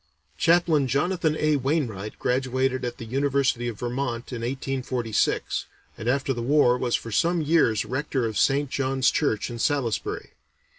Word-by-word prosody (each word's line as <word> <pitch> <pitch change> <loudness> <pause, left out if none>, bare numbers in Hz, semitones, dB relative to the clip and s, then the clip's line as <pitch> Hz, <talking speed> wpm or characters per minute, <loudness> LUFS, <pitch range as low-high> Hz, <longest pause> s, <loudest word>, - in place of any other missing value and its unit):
Chaplain 165 - +3
Jonathan 160 +3 0
A. 155 -1 +2
Wainwright 125 -8 -2
graduated 130 +1 0
at 120 - -3
the 115 - -7
University 135 -1 0
of 115 -3 -4
Vermont 120 0 -3
in 120 - -4
1846, 125 -2 -1 0.3
and 115 - -3
after 135 +1 +1
the 120 - -4
war 125 -1 +4
was 125 -1 0
for 115 - -4
some 170 +10 +2
years 150 -9 +2
rector 130 -1 -2
of 110 -1 -3
St. 135 +5 +2
John's 130 -1 +1
Church 120 -7 0
in 120 - -6
Salisbury. 130 -4 -1
130 Hz, 150 wpm, -25 LUFS, 120-145 Hz, 0.3 s, war